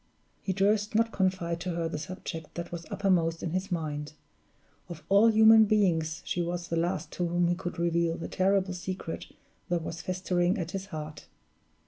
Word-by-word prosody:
He 195 - -2
durst 205 +3 +1
not 230 +1 +3
confide 185 -4 0
to 180 -1 -3
her 170 -1 -1
the 160 -2 -4
subject 165 -1 -7
that 170 0 -5
was 170 -1 -6
uppermost 180 -5 +1
in 170 - -2
his 185 +3 -2
mind; 150 -3 -3 0.8
of 170 -3 -8
all 200 +3 +6
human 220 0 +7
beings 170 -7 +1
she 175 - -1
was 175 0 -3
the 165 - -1
last 165 -1 -1
to 175 - -1
whom 175 0 +2
he 175 - +2
could 175 0 -5
reveal 170 0 +1
the - - -5
terrible 190 0 +1
secret 180 -1 -5 0.4
that 175 -2 0
was 165 +1 -5
festering 185 +1 0
at 175 -3 -3
his 195 0 -5
heart. 155 -4 -7
175 Hz, 180 wpm, -29 LUFS, 165-190 Hz, 0.8 s, human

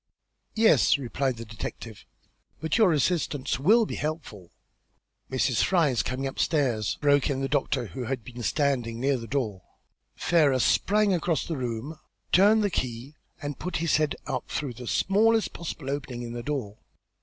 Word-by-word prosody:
"Yes," 220 -7 +5
replied 130 -1 -2
the 115 - -7
detective, 110 0 -8 0.5
"but 160 -1 -1
your 220 -6 +5
assistance 150 -4 0
will 220 - +5
be - - -6
helpful." 145 - -5 0.8
"Mrs. 130 -2 +1
Fry 170 -5 +3
is 120 -5 +1
coming 130 +4 -3
upstairs," 130 - 0
broke 145 -2 +3
in 135 -2 -1
the 135 - 0
doctor, 140 -4 0
who 115 +5 -6
had 130 -1 -3
been 120 +2 -9
standing 120 -3 0
near 135 +1 +1
the 115 -1 -8
door. 110 -9 -2 0.5
Ferrars 145 -7 +3
sprang 210 0 +3
across 170 -2 0
the 165 - -3
room, 130 +4 -4 0.3
turned 210 +4 +5
the 205 - 0
key, 125 0 -3 0.3
and 145 -1 -5
put 180 -1 -4
his 165 0 +2
head 155 -2 0
out - - -3
through 140 -4 -3
the 125 +1 -9
smallest 220 - +2
possible 150 -5 -5
opening 130 -4 -4
in 120 0 -6
the 120 - -4
door. 120 -7 -4
140 Hz, 165 wpm, -27 LUFS, 120-160 Hz, 0.8 s, Yes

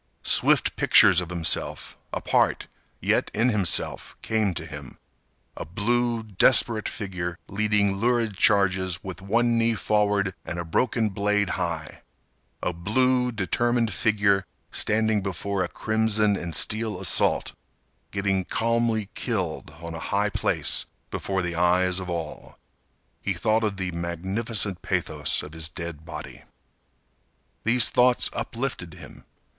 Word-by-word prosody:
Swift - - +3
pictures 90 -1 +6
of 85 - -7
himself, 85 -2 0 0.2
apart, - - +1 0.3
yet - - +1
in 115 +4 +3
himself, 105 -6 0
came 110 -3 +1
to 80 -2 -6
him—a 75 -4 -12
blue 115 +6 -1
desperate 110 +1 +3
figure 90 -4 -5
leading 100 -1 +1
lurid 115 -1 0
charges 95 -3 +2
with 95 -1 -7
one 115 +4 +1
knee 115 0 +2
forward 105 -3 +1
and 85 - -6
a 85 - -4
broken 110 +6 0
blade 100 0 0
high—a 90 - -6
blue, 125 +8 +1
determined 115 +3 0
figure 100 -3 +2 0.3
standing 110 -1 +1
before 95 0 -2
a - - -2
crimson 110 0 +1
and 85 -3 -4
steel 110 -3 0
assault, 95 - +2 0.6
getting 100 -1 0
calmly 115 0 0
killed 95 -13 -3
on 85 0 -7
a 80 - -6
high 100 +5 0
place - - 0 0.2
before 95 -1 -2
the 85 0 -3
eyes 90 +2 +2
of 90 -1 -6
all. 85 -3 -6 0.6
He - - -1
thought 110 +1 +1
of 105 -3 -1
the 95 -1 -3
magnificent 95 +4 -1
pathos 80 -6 -1
of 75 - -10
his 80 -1 -4
dead 85 -1 -7
body. 85 - -9 1.2
These 120 +2 +6
thoughts 125 0 +3
uplifted 115 - -4
him. - - -13
100 Hz, 125 wpm, -25 LUFS, 90-110 Hz, 1.2 s, pictures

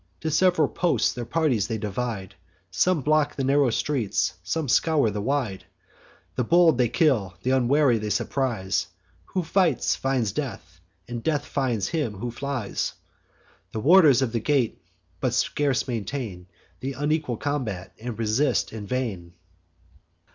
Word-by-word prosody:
To 160 - -2
sev'ral 170 -2 +3
posts 175 -2 +1
their 120 -1 -5
parties 140 -11 +1
they 115 -1 -2
divide; 105 -2 -4 0.4
Some 175 - +2
block 150 +1 +2
the 135 - -2
narrow 135 0 +3
streets, 115 - 0
some 150 - -2
scour 145 -2 +3
the 105 0 -3
wide: 120 -6 -2 0.7
The 125 - -1
bold 165 0 +4
they 120 -2 +3
kill, 115 - +1
th' 125 - 0
unwary 130 -1 +3
they 105 0 -3
surprise; 100 -7 -1 0.4
Who 185 - -2
fights 170 -4 +2
finds 130 -6 0
death, 110 - -6 0.3
and 120 -1 -5
death 145 +1 0
finds 125 -7 -1
him 145 -10 -2
who 120 +5 -4
flies. 130 -3 -3 0.8
The 110 - -2
warders 145 - +6
of 120 - -1
the 115 - 0
gate 125 -4 0 0.4
but 125 -2 0
scarce 135 +4 0
maintain 110 -6 -4 0.3
Th' 135 +1 -4
unequal 145 -4 -1
combat, 105 -11 -3
and 120 -2 -5
resist 115 +5 +1
in 105 -2 -6
vain. 100 -9 -3
125 Hz, 145 wpm, -25 LUFS, 110-145 Hz, 0.8 s, warders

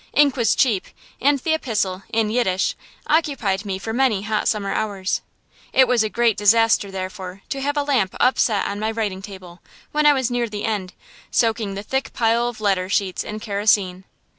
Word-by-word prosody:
Ink 285 -2 +4
was 235 -5 +2
cheap, 220 -8 +2 0.4
and 285 +2 +4
the 315 +4 -1
epistle, 210 -10 -1
in 225 -2 +1
Yiddish, 190 -6 +1 0.3
occupied 250 - 0
me 195 -2 -3
for 220 +3 -5
many 235 -6 +1
hot 215 0 -1
summer 200 -2 0
hours. 200 -3 -2 0.5
It 260 -1 +6
was 245 -2 +3
a 215 - 0
great 235 -1 +2
disaster, 215 0 +4
therefore, 185 0 -6
to 275 - -3
have 290 +2 -1
a 290 - +2
lamp 255 -10 0
upset 235 -4 +2
on 200 0 -3
my 215 +1 -1
writing 215 -4 -3
table, 190 -3 -11 0.3
when 300 0 +3
I 295 - +7
was 260 -3 -1
near 240 -1 -1
the 210 -1 -4
end, 200 -5 -2 0.4
soaking 220 -3 0
the 200 - -5
thick 265 +5 -2
pile 230 +1 +2
of 240 -2 -6
letter 190 -3 0
sheets 195 -2 0
in 215 +1 -6
kerosene. 200 -3 0
215 Hz, 190 wpm, -21 LUFS, 195-245 Hz, 0.5 s, I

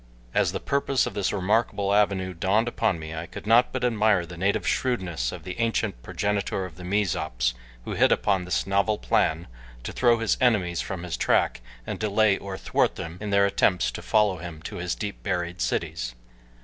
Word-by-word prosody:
As - - +2
the - - -3
purpose 140 -2 +1
of - - -4
this 100 -2 0
remarkable 100 0 +1
avenue 100 -3 +2
dawned 95 +7 +1
upon 95 -6 0
me 80 0 -7
I 80 +1 -5
could - - -9
not 115 +3 +5
but 130 -1 -3
admire 110 -6 +3
the 85 +1 -10
native 95 +4 0
shrewdness 90 - -1
of 85 - -8
the 90 +3 -7
ancient 115 - 0
progenitor 100 +3 -1
of 85 -4 -10
the 90 - -10
Mezops 90 -11 0 0.3
who - - -5
hit - - +4
upon 95 -3 +2
this 90 - 0
novel 100 +2 +1
plan 80 -3 +1 0.4
to - - -4
throw 120 -2 +4
his 115 -2 +1
enemies 95 -9 +2
from 95 -3 -5
his 90 - -3
track - - +2 0.2
and - - -4
delay 110 -1 +3
or 95 -1 -6
thwart - - +1
them 85 +2 -7
in 105 - -4
their 100 0 +4
attempts 90 -9 +2
to - - -7
follow 105 -3 +2
him 80 -2 -8
to - - -6
his 85 0 -2
deep 105 -2 -5
buried 90 +1 -2
cities. - - -2
95 Hz, 195 wpm, -26 LUFS, 85-105 Hz, 0.4 s, not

